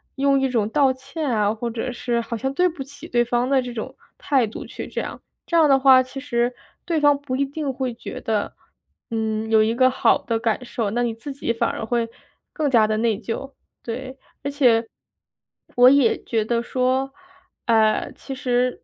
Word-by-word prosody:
用 275 0 +3
一 270 - +1
种 225 -5 0
道 270 +1 +3
歉 275 +3 -5
啊， 210 -3 +1
或 235 +2 -4
者 235 +2 -3
是 240 -1 -1
好 230 0 -5
像 265 +4 -2
对 360 +5 +3
不 320 -4 -9
起 285 +3 -12
对 240 -1 +2
方 245 +1 0
的 275 -1 +3
这 245 -1 -6
种 240 +3 -5 0.2
态 265 -5 +1
度 210 - -8
去 - - -7
这 - - -3
样， - - -7 0.2
这 340 - +1
样 320 -2 +6
的 275 -1 +5
话 265 -1 +7
其 255 +2 -8
实 240 -3 0 0.3
对 325 -3 0
方 290 -1 +4
不 285 -3 -4
一 275 - +1
定 280 0 -3
会 255 -1 -2
觉 235 - -8
得， 215 -2 -1 0.6
嗯， 220 -1 -2
有 220 -1 +5
一 220 +1 +1
个 255 +2 +4
好 260 - +3
的 230 - -2
感 225 +1 -1
受， 230 -4 -3
那 240 +3 0
你 240 -1 0
自 275 +5 -7
己 270 -3 -2
反 230 - 0
而 - - -5
会 230 +1 0 0.5
更 305 -3 0
加 230 -4 +5
得 215 0 0
内 225 -2 +1
疚。 240 +5 -5 0.3
对， 255 +3 -6 0.3
而 280 - -2
且 240 -5 +3 0.9
我 245 +1 +8
也 270 -4 +3
觉 220 -2 -1
得 235 +1 0
说， 255 +2 0 0.5
呃， 220 -2 +2
其 270 - -8
实 250 -1 0
250 Hz, 220 characters per minute, -22 LUFS, 230-270 Hz, 0.9 s, 我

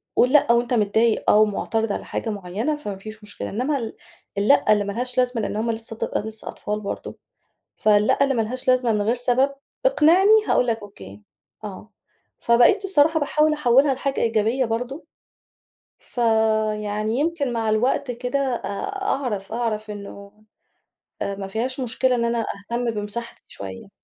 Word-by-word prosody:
قُل 250 - +4
لأ 295 -6 +5
وأنت 240 +1 +2
متضايق 220 +1 +2
آه، - - +6
ومُعترض 215 +1 +1
على - - -5
حاجة 225 - -4
معينة، 205 +8 -2
فما 210 -10 -6
فيش 215 +2 -10
مشكلة. 205 - -7
إنّما 260 +7 -1
ال 225 -3 -5 0.4
اللأ 215 +1 +4
اللي 205 - +1
ما 200 0 -4
لهاش 250 +3 -3
لازمة، 250 -2 +1
لأن 205 - -3
هُم 230 +2 0
لسه 225 0 -6
ط - - -2
لسه 220 0 -6
أطفال 210 0 -4
برضه، 200 - -6 0.6
فاللأ 210 +5 +3
اللي 275 - +1
ما 230 - +1
لهاش 255 +4 -4
لازمة 250 -2 +3
من 210 - +1
غير 220 +4 +1
سبب، 250 +3 +2 0.3
اقنِعني 380 -2 +5 0.2
هاقول 250 - +2
لك 225 -1 0
أوكي، 105 - -12 0.4
آه. 210 +1 -9 0.5
فبَقيت 240 - +4
الصراحة 320 -4 +4
باحاول 305 +1 +2
أحوِّلها 275 -1 +4
لحاجة 270 +1 -2
إيجابية 230 +3 +1
برضه، 245 +7 -4 0.9
فيعني 220 -2 0
يمكن 300 -4 -1
مع 225 -2 -1
الوقت 250 +4 +1
كده، 245 +3 -2
آآ، 265 -4 -2 0.4
أعرف، 230 - -2
أعرف 220 -2 -2
إنه، 200 0 -9 0.9
آآ، 200 - -2
ما 195 -1 -5
فيهاش 245 +7 -3
مشكلة 255 +1 +1
إن 235 -1 0
أنا 235 -1 0 0.2
أهتم 240 0 0
بمساحتي 210 +2 -5
شوية. 95 - -9
230 Hz, 160 wpm, -23 LUFS, 215-255 Hz, 0.9 s, آه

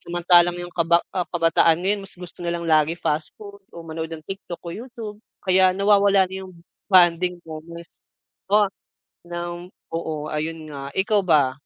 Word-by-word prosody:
samantalang 175 0 +4
yung 175 0 -7
kaba 170 0 +3
ah, 180 -2 -1
kabataan 165 0 +3 0.2
mas 195 - -11
gusto 180 -1 -11
na 170 -1 -2
lang 170 0 -4
lagi 155 0 +3
fast 155 -2 -2
food 200 -1 -12
o 170 - -9
manood 160 0 -5
ng 155 -1 -8
TikTok 190 -2 -7
o 170 - -5
YouTube 225 -1 -8 0.3
kaya 185 -1 +4
nawawala 200 -1 +4
na 185 +1 -8
yung 185 - -12 0.4
bonding 180 -1 +4
moments. 165 +1 -10 0.5
Oh, 205 0 +4 0.6
ng 175 0 -6 0.2
oo 155 -2 -4
ayun 155 +1 -4
nga, 140 -1 -7
ikaw 205 +2 +3
ba? 145 -7 +3
175 Hz, 160 wpm, -23 LUFS, 165-190 Hz, 0.6 s, samantalang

